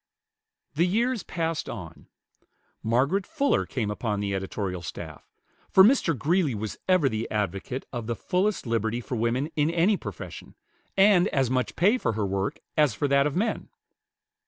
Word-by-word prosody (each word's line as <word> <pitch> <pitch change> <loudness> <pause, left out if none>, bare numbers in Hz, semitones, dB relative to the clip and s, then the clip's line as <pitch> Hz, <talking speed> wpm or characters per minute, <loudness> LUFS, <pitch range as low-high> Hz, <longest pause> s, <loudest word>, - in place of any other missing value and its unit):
The 165 +5 +2
years 235 +4 +1
passed 165 -3 -3
on. 85 -7 -8 0.7
Margaret 135 - +1
Fuller 285 -4 +1
came 110 -5 -2
upon 105 -1 -2
the 100 -1 -2
editorial 95 -1 -3
staff; 80 -2 -8 0.4
for 190 - +7
Mr. 200 - +4
Greeley 155 - +1
was 105 0 -5
ever 185 -6 +4
the 110 -2 -2
advocate 105 +5 -3
of 120 -3 -4
the 120 - -1
fullest 185 - 0
liberty 115 0 0
for 125 +1 -5
woman 120 +7 0
in 150 0 +2
any 175 +5 +3
profession, - - -8 0.4
and 195 -2 +6
as 135 - 0
much 130 -1 0
pay 205 +9 +3
for 115 - 0
her 105 -1 -1
work 95 0 -2
as 150 -7 +3
for 145 - 0
that 140 +1 +4
of 150 - -4
men. 215 +5 -1
135 Hz, 160 wpm, -26 LUFS, 110-180 Hz, 0.7 s, for